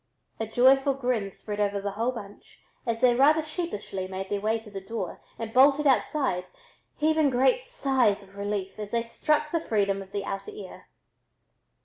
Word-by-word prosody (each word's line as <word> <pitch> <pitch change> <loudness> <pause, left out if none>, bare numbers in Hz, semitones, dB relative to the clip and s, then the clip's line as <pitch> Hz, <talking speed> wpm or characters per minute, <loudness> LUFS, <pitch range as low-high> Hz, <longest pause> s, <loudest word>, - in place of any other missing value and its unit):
A 225 - -2
joyful 270 +4 +4
grin 245 -6 -1
spread 205 +2 -7
over 205 -1 +1
the 200 0 -3
whole 230 +5 -1
bunch 205 -5 -11 0.3
as 230 0 -1
they 250 -1 +6
rather 300 +5 +4
sheepishly 300 - -4
made 190 0 -5
their 200 -1 -1
way 220 +2 +1
to 215 -2 -13
the 195 -1 -6
door 195 -2 -5 0.2
and 225 -1 -6
bolted 280 +3 +5
outside, 265 -8 +1 0.5
heaving 310 -1 +3
great 265 - +3
sighs 265 - +1
of 195 0 -18
relief 200 -1 -3
as 210 -1 -5
they 230 +1 0
struck 300 +6 0
the 335 - 0
freedom 200 -6 0
of 190 0 -11
the 200 -1 -3
outer 200 - -5
air. 425 - -10
230 Hz, 175 wpm, -27 LUFS, 200-275 Hz, 0.5 s, they